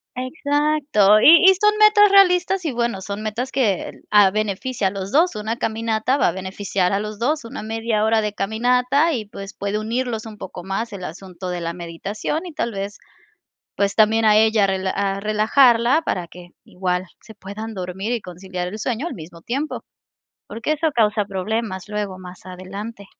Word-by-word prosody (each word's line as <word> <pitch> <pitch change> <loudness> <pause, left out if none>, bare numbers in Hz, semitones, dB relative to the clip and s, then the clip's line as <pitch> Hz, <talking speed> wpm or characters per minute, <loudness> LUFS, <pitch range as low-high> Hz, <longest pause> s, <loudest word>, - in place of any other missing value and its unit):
Exacto, 285 -5 +2
y 330 +7 +8
y 385 - +9
son 420 0 +4
metas 425 -1 +6
realistas 380 -1 +4
y, 310 - 0
bueno, 235 -5 -2
son 200 +2 -5
metas 225 +5 -4
que 215 -8 +1
el - - -14
ah, 205 -2 +6
beneficia 215 +2 -1
a - - +1
los 195 0 -6
2 325 0 +3
una 215 +2 -3
caminata, 225 +3 -1
va - - +3
a - - -1
beneficiar 190 0 -2
a 195 - +1
los 210 0 -6
2 295 +6 0
una 250 +5 -7
media 220 0 -1
hora 220 0 +3
de 210 -1 -3
caminata 250 +9 +1
y, 225 -6 -3
pues, 200 -1 -9
puede 200 +1 -3
unirlos 230 +1 -3
un 220 -2 -10
poco 180 -3 -8
más 195 +5 -3
el 190 -2 -7
asunto 180 +1 -8
de 180 -1 -4
la 170 0 -3
meditación 190 - -4
y 340 - -9
tal 235 - -2
vez, 200 0 -5 0.8
pues, 200 0 0
también 220 +1 +4
a 210 -1 +6
ella 220 -1 +4
a - - 0
rela 190 0 -1
a 195 -1 -1
relajarla 235 +6 +3
para 180 - -2
que 175 +1 -13 0.2
igual 180 0 -2
se 220 - -14
puedan 215 +2 -8
dormir 190 +3 -4
y 240 -2 -1
conciliar 180 0 -6
el 200 +4 -6
sueño 245 +7 -2
al - - -6
mismo 165 0 -11
tiempo, 275 - -4 0.6
porque 230 +7 -3
eso 315 +1 0
causa 215 -2 +2
problemas 200 0 -3
luego 205 -3 -4
más 180 0 -12
adelante. 195 +3 -8
215 Hz, 190 wpm, -21 LUFS, 195-245 Hz, 0.8 s, y